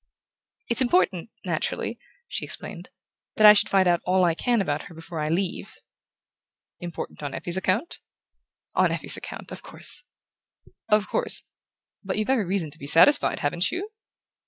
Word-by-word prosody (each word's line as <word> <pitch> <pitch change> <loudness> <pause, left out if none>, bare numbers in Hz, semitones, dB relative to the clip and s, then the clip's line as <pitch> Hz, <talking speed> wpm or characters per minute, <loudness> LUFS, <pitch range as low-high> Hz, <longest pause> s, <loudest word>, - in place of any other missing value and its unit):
"It's 235 +2 +2
important, 185 -5 +2 0.2
naturally," - - -2 0.3
she - - -4
explained, - - -4 0.5
"that 215 - +4
I 210 - +11
should 205 - +2
find 190 -2 +3
out 175 -1 +3
all 185 0 +2
I 170 - +2
can 240 +7 +1
about 150 -7 -1
her 170 - -12
before 165 0 -7
I 150 0 -1
leave." 180 +2 -2 1.0
"Important 175 -3 -7
on 145 -2 -5
Effie's 175 - -4
account?" 190 - -1 0.7
"On - - +3
Effie's - - +2
account - - -8
of - - -7
course." - - -3 0.8
"Of 210 -1 +3
course...But 220 - -5
you've 215 +4 0
every 240 -7 +2
reason 180 -4 -2
to 150 - -12
be 140 - -8
satisfied, 165 - +5
haven't 170 +5 0
you?" 390 +5 -4
185 Hz, 155 wpm, -25 LUFS, 170-215 Hz, 1.0 s, I